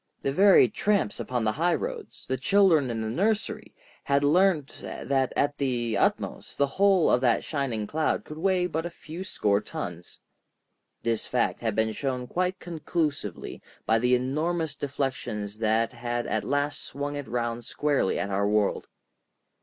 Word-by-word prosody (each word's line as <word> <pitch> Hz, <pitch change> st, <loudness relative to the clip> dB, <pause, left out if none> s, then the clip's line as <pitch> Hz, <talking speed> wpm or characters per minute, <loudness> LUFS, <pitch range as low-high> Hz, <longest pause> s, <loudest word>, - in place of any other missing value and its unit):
The 135 Hz, -, +1 dB
very 195 Hz, +7 st, +6 dB
tramps 205 Hz, -, 0 dB
upon 125 Hz, -2 st, -2 dB
the 110 Hz, -, +2 dB
high 170 Hz, +9 st, +1 dB
roads, 475 Hz, -3 st, -6 dB
the 130 Hz, -, -1 dB
children 160 Hz, -1 st, +4 dB
in 115 Hz, -1 st, -2 dB
the 110 Hz, -, -2 dB
nursery, 210 Hz, -, -1 dB, 0.3 s
had 140 Hz, 0 st, +2 dB
learnt 160 Hz, -1 st, +2 dB
that 135 Hz, -2 st, -1 dB
at 145 Hz, +1 st, 0 dB
the 120 Hz, -5 st, 0 dB
utmost -, -, -1 dB
the 140 Hz, -, +4 dB
whole 190 Hz, +4 st, +3 dB
of 125 Hz, -, +3 dB
that 120 Hz, -3 st, +2 dB
shining 130 Hz, -8 st, -2 dB
cloud 155 Hz, +8 st, -1 dB
could 155 Hz, +1 st, -8 dB
weigh 185 Hz, 0 st, +2 dB
but 165 Hz, -2 st, -2 dB
a 175 Hz, -, -3 dB
few 170 Hz, +1 st, -8 dB
score 105 Hz, -, +1 dB
tons. 85 Hz, 0 st, -7 dB, 0.9 s
This 115 Hz, -2 st, 0 dB
fact 125 Hz, -1 st, 0 dB
had 110 Hz, -3 st, -1 dB
been 110 Hz, 0 st, +1 dB
shown 125 Hz, +1 st, -3 dB
quite 180 Hz, +7 st, -1 dB
conclusively 155 Hz, -, -3 dB, 0.2 s
by 110 Hz, 0 st, +3 dB
the 125 Hz, +2 st, +3 dB
enormous 155 Hz, +5 st, -1 dB
deflections 125 Hz, -7 st, -3 dB
that 115 Hz, +2 st, +1 dB
had 120 Hz, 0 st, -3 dB
at 110 Hz, -, -1 dB
last 145 Hz, +1 st, -1 dB
swung 145 Hz, +1 st, -4 dB
it 145 Hz, -1 st, -5 dB
round 120 Hz, 0 st, -2 dB
squarely 145 Hz, -3 st, 0 dB
at 100 Hz, 0 st, -2 dB
our 100 Hz, +1 st, +1 dB
world. 105 Hz, -1 st, +1 dB
135 Hz, 160 wpm, -27 LUFS, 115-165 Hz, 0.9 s, very